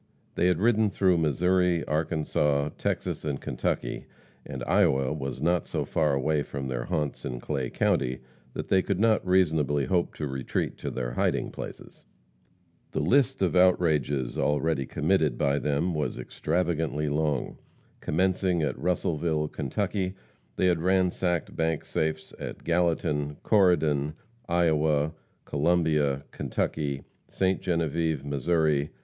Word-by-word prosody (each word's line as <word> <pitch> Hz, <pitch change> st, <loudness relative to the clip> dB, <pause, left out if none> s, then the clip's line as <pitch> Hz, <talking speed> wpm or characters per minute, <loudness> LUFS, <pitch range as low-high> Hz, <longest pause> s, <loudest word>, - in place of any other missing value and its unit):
They 90 Hz, -, +2 dB
had 90 Hz, -2 st, +3 dB
ridden 110 Hz, +1 st, +3 dB
through 95 Hz, -3 st, +2 dB
Missouri, 90 Hz, +2 st, +2 dB
Arkansas, 75 Hz, -2 st, 0 dB
Texas -, -, -2 dB
and 75 Hz, -3 st, -2 dB
Kentucky, -, -, -3 dB, 0.4 s
and 65 Hz, -3 st, -6 dB
Iowa 65 Hz, +3 st, +2 dB
was 70 Hz, -1 st, -5 dB
not 85 Hz, +1 st, +1 dB
so -, -, -2 dB
far 75 Hz, -3 st, +1 dB
away 75 Hz, +2 st, +1 dB
from 70 Hz, -1 st, -5 dB
their -, -, -3 dB
haunts 75 Hz, -5 st, -2 dB
in 60 Hz, -1 st, -4 dB
Clay 65 Hz, -1 st, -2 dB
county 65 Hz, 0 st, 0 dB, 0.3 s
that -, -, -5 dB
they 95 Hz, -, +4 dB
could 95 Hz, 0 st, -2 dB
not 110 Hz, 0 st, +3 dB
reasonably 80 Hz, -6 st, +2 dB
hope 90 Hz, -3 st, 0 dB
to 75 Hz, -, -3 dB
retreat 65 Hz, -2 st, -2 dB
to -, -, -3 dB
their -, -, -3 dB
hiding -, -, 0 dB
places. -, -, -9 dB, 0.9 s
The -, -, 0 dB
list 135 Hz, -4 st, +2 dB
of 90 Hz, -, +1 dB
outrages 75 Hz, -8 st, +2 dB
already 75 Hz, -2 st, +1 dB
committed 75 Hz, -4 st, +1 dB
by 70 Hz, +1 st, +1 dB
them 75 Hz, +5 st, 0 dB
was 75 Hz, -1 st, -2 dB
extravagantly 80 Hz, -2 st, -1 dB
long. 75 Hz, -2 st, -1 dB, 0.4 s
Commencing 90 Hz, 0 st, +1 dB
at 75 Hz, -, -2 dB
Russellville, 80 Hz, -3 st, 0 dB
Kentucky, 95 Hz, +6 st, -2 dB, 0.4 s
they -, -, +1 dB
had 85 Hz, -3 st, +2 dB
ransacked 90 Hz, -1 st, +1 dB
bank 80 Hz, -1 st, -1 dB
safes 80 Hz, 0 st, -2 dB
at -, -, -7 dB
Gallatin, 80 Hz, -4 st, 0 dB
Corydon, 80 Hz, -8 st, +3 dB, 0.3 s
Iowa, 80 Hz, -3 st, +2 dB, 0.3 s
Columbia, 75 Hz, -3 st, +1 dB
Kentucky, 70 Hz, -3 st, -2 dB, 0.2 s
Ste. 95 Hz, 0 st, 0 dB
Genevieve, 80 Hz, -4 st, 0 dB
Mo. 75 Hz, +1 st, +1 dB
80 Hz, 130 wpm, -27 LUFS, 70-90 Hz, 0.9 s, they